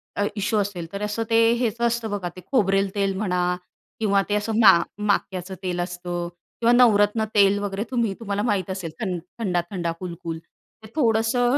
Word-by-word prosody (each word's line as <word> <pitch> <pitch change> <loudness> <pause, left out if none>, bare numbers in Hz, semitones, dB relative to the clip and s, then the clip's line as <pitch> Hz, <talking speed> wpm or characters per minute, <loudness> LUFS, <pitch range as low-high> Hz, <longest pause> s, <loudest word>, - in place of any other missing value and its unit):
अ, 205 - +1
issue 205 +1 0
असेल. 195 -5 -2
तर 200 - -4
असं 210 +2 -1
ते 230 0 +5
हेचं 235 0 +1
असतं 235 -1 -2
बघा 195 -4 -2
ते 185 - -10
खोबरेल 195 -6 +2
तेल 195 -1 +1
म्हणा 180 -3 0 0.4
किंवा 200 -3 +3
ते 205 - +2
असं 210 +2 -1
मा 225 - +9 0.3
माक्याचं 190 -2 -1
तेल 180 -1 -2
असतं 175 -1 -3 0.3
किंवा 235 0 +4
नवरत्न 220 -3 +4
तेल 200 -1 +5
वगैरे 205 0 -2
तुम्ही 235 -5 +1
तुम्हाला 205 -3 -2
माहीत 200 -6 0
असेल. 185 -4 -4
थंड 185 -5 -2 0.2
थंडा-थंडा 175 -3 -1
कुलकुल. 170 -2 -5 0.5
ते - - -10
थोडंसं 240 -1 +2
200 Hz, 170 wpm, -24 LUFS, 185-225 Hz, 0.5 s, मा